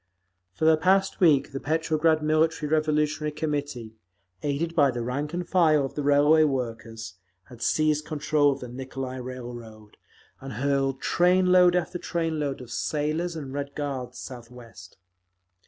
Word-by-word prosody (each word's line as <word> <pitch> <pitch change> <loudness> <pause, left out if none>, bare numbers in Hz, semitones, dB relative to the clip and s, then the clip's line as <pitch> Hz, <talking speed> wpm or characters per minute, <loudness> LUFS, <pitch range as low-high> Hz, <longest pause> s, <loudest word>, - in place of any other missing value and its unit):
For 155 - -1
the 160 0 +6
past 190 +4 +2
week 145 -7 +4
the 135 - -4
Petrograd 160 +1 +1
Military 155 0 +1
Revolutionary 150 0 0
Committee, 145 -7 -4 0.5
aided 150 +4 -2
by 145 -3 +5
the 120 -2 -3
rank 140 +5 -3
and 175 0 -4
file 155 -6 +3
of 135 - -7
the 150 - -3
Railway 145 +2 +5
Workers, 115 - -4 0.3
had 120 -2 -13
seized 155 +1 +1
control 150 -1 +1
of 135 - -5
the 125 - -6
Nicolai 130 +1 -6
Railroad, 120 -4 -9 0.4
and 135 0 -8
hurled 135 0 0
trainload 180 +1 +4
after 175 0 -1
trainload 160 -6 -2
of 125 -2 -11
sailors 155 +7 -2
and 140 -4 -6
Red 140 0 -5
Guards 140 -4 -4
southwest…. 120 -6 -11
145 Hz, 140 wpm, -26 LUFS, 130-155 Hz, 0.5 s, the